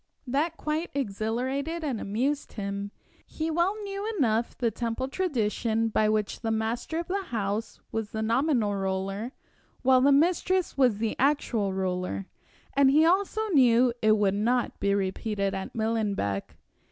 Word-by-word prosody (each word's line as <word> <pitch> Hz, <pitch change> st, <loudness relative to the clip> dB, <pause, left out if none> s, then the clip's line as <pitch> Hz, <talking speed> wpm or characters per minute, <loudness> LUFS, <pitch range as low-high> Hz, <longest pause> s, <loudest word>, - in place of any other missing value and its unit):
That 295 Hz, +6 st, 0 dB
quite 310 Hz, +3 st, -2 dB
exhilarated 260 Hz, +7 st, -2 dB
and 265 Hz, -7 st, -2 dB
amused 265 Hz, +8 st, -1 dB
him. 200 Hz, -1 st, -4 dB, 0.3 s
He 320 Hz, +1 st, -4 dB
knew -, -, -3 dB
well 350 Hz, +6 st, +1 dB, 0.4 s
enough 230 Hz, -5 st, +1 dB
the 235 Hz, -3 st, +1 dB
Temple 235 Hz, +3 st, -2 dB
tradition, 225 Hz, -, 0 dB
by 215 Hz, 0 st, +2 dB
which 215 Hz, -1 st, -1 dB
the 225 Hz, -, -2 dB
master 225 Hz, +7 st, -1 dB
of 340 Hz, -, -3 dB
the 390 Hz, +1 st, -2 dB
house 215 Hz, -, -3 dB
was 225 Hz, -2 st, -3 dB
the 220 Hz, +1 st, -3 dB
nominal 235 Hz, -2 st, +2 dB
ruler, 195 Hz, +3 st, -2 dB, 0.5 s
while 260 Hz, 0 st, +5 dB
the 280 Hz, +2 st, +5 dB
mistress 350 Hz, +5 st, +2 dB
was 250 Hz, -6 st, +3 dB
the 220 Hz, 0 st, -1 dB
actual 245 Hz, -7 st, +1 dB
ruler, 185 Hz, 0 st, -2 dB, 0.5 s
and 275 Hz, -1 st, +5 dB
he 305 Hz, +4 st, +5 dB
also 400 Hz, +5 st, +2 dB
knew 250 Hz, -, +5 dB
it 215 Hz, 0 st, +4 dB
would 200 Hz, -2 st, +2 dB
not 235 Hz, +4 st, 0 dB
be 200 Hz, 0 st, +2 dB
repeated 200 Hz, +1 st, -1 dB
at 190 Hz, -, -5 dB
Millenbeck. 210 Hz, -, -1 dB
230 Hz, 150 wpm, -27 LUFS, 210-280 Hz, 0.5 s, while